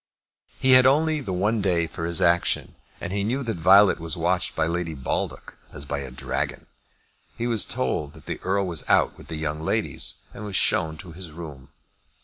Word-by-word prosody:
He 130 - +3
had 130 0 +8
only 155 +2 +2
the 100 - -5
one 105 +4 +1
day 90 -4 +1
for 80 0 -5
his 85 -1 +1
action, 85 0 +2 0.3
and 85 - -5
he 100 0 0
knew 125 +6 -1
that 115 -5 -3
Violet 95 +4 +6
was 80 -1 -2
watched 90 +2 0
by - - +1
Lady 85 -1 -2
Baldock 65 - -4
as 70 - -7
by 70 0 -3
a 70 -2 -6
dragon. 65 +2 -4 0.7
He 120 - -2
was 115 -4 +2
told 75 -1 -2
that - - -16
the - - -5
Earl 100 +1 0
was 85 -6 -1
out - - +3
with - - -14
the 80 - -5
young 75 -1 -3
ladies, 80 - -1
and 105 - -8
was 105 -2 -5
shown 80 -1 +2
to 90 0 -10
his 85 0 -9
room. 75 -5 -10
85 Hz, 200 wpm, -24 LUFS, 80-105 Hz, 0.7 s, had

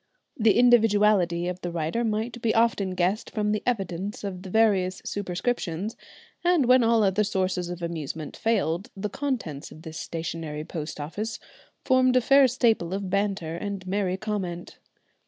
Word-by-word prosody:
The 220 -6 +3
individuality 210 -7 +4
of 180 0 -4
the 175 - -3
writer 170 +7 -1
might 225 +1 -2
be 225 -1 +1
often 215 -5 +2
guessed 185 +5 0
from 210 -1 -1
the 210 - 0
evidence 195 -3 -2
of 190 -3 -5
the 190 - -8
various 190 -3 +2
superscriptions, 200 0 -2 0.5
and 350 -6 +3
when 255 0 +5
all 230 -1 +4
other 200 +1 +2
sources 185 -3 -1
of 175 -1 -6
amusement 160 -2 -5
failed 205 -2 0
the 205 +2 -3
contents 235 - -3
of 155 - -13
this 160 -2 -7
stationary 160 -2 -5
post 155 -2 -6
office 205 +10 -4 0.5
formed 255 -1 +4
a 255 - +5
fair 275 +3 +6
staple 225 -8 +1
of 195 -2 -4
banter 195 -5 -1
and 200 +1 -5
merry 190 -1 -1
comment. 190 -5 -4
200 Hz, 155 wpm, -26 LUFS, 175-225 Hz, 0.5 s, fair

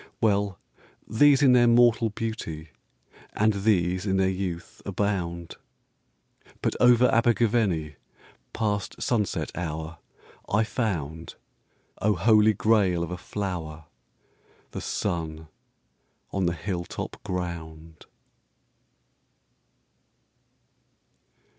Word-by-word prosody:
Well: 100 -3 +1 0.5
these 140 +5 +4
in 130 -2 +6
their 120 -1 +5
mortal 120 -1 +4
beauty, 100 -8 -5 0.6
And 110 +1 +2
these 95 -2 +1
in 95 0 +1
their 95 0 +2
youth, 90 -2 -5
abound. 90 -4 -3 1.1
But - - 0
over 125 0 +6
Abergavenny, 110 - +1 0.5
Past 105 -3 -2
sunset 105 -6 -1
hour, 80 -1 -5 0.5
I 100 +3 +3
found 85 - -3 0.7
(O 105 0 +2
Holy 110 +4 +4
Grail 95 -5 +2
of 85 - -5
a - - -2
flower!) 85 -5 -5 0.9
The - - -6
sun 80 -2 -3 0.8
on 95 -2 0
the 85 - +1
hilltop 85 0 -5
ground. 80 -3 -6
95 Hz, 90 wpm, -26 LUFS, 85-110 Hz, 1.1 s, in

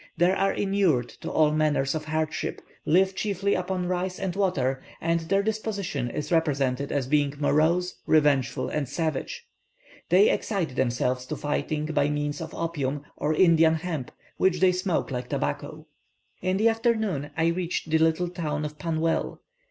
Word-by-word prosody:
They 175 +2 +4
are 195 +1 +2
inured 190 - +1
to - - -4
all 155 -1 +3
manner 155 -2 +2
of 155 -1 -4
hardships, 155 0 -2 0.2
live 190 +4 +4
chiefly 200 -1 0
upon 180 0 -1
rice 185 +1 -2
and 190 -2 -2
water, 135 -10 0 0.2
and 165 +1 +1
their 195 +5 +1
disposition 200 - -2
is 150 +5 -5
represented 140 -5 +1
as 140 -3 0
being 145 +1 +1
morose, 160 +5 +2
revengeful, 145 -5 +2
and 145 -4 -2
savage. 170 - -3 0.6
They 435 +4 +6
excite 185 - -2
themselves 125 0 0
to 155 - -3
fighting 150 +1 -2
by 150 -2 +1
means 145 0 -2
of 160 0 -7
opium, 145 -4 -2
or 155 +1 0
Indian 165 -2 +5
hemp, 160 -5 -4 0.3
which 185 -2 +2
they 185 +1 +5
smoke 180 -4 -1
like 125 -1 -4
tobacco. 70 0 -3 0.6
In 185 +1 0
the 220 +3 +4
afternoon, 220 - 0
I 165 +1 +3
reached 175 0 -2
the 160 - +4
little 160 +2 +2
town 150 -4 -3
of 150 0 -7
Pannwell. 165 0 -1
160 Hz, 160 wpm, -26 LUFS, 145-185 Hz, 0.6 s, They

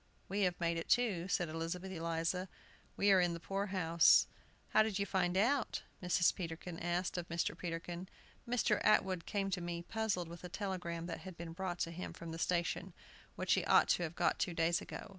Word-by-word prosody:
"We 200 +2 -1
have 175 - -13
made 170 -1 0
it, 165 - -5
too," 200 -8 +2
said 180 -2 +1
Elizabeth 165 +4 -4
Eliza; 170 +2 -1 0.5
"we 200 0 +4
are 190 -1 +6
in 175 -1 +2
the - - -6
poor 195 +4 -2
house." 170 -4 +5 0.4
"How - - +5
did 215 -3 +1
you 200 - 0
find 185 -2 +1
it - - +5
out?" 260 +3 +1 0.2
Mrs. 180 0 +3
Peterkin 165 -1 -6
asked 175 +1 -1
of 175 - -7
Mr. 170 0 -1
Peterkin. 175 +1 -5 0.4
"Mr. 235 -3 +2
Atwood 190 -5 +3
came 195 -2 -1
to 180 -1 -1
me, 170 0 -4
puzzled 200 -3 -1
with 170 +1 -10
a 180 - -6
telegram 180 -3 -3
that 170 -1 -5
had 185 -3 -9
been 165 -1 -6
brought 180 0 -3
to 165 - -1
him 175 +2 -6
from 165 -1 -8
the 165 - -6
station, 175 +1 -1 0.4
which - - +1
he - - +2
ought - - +5
to - - +3
have 170 -1 -3
got - - +1
two 175 - -1
days 165 +1 +2
ago. - - -8
175 Hz, 210 wpm, -35 LUFS, 170-190 Hz, 0.5 s, are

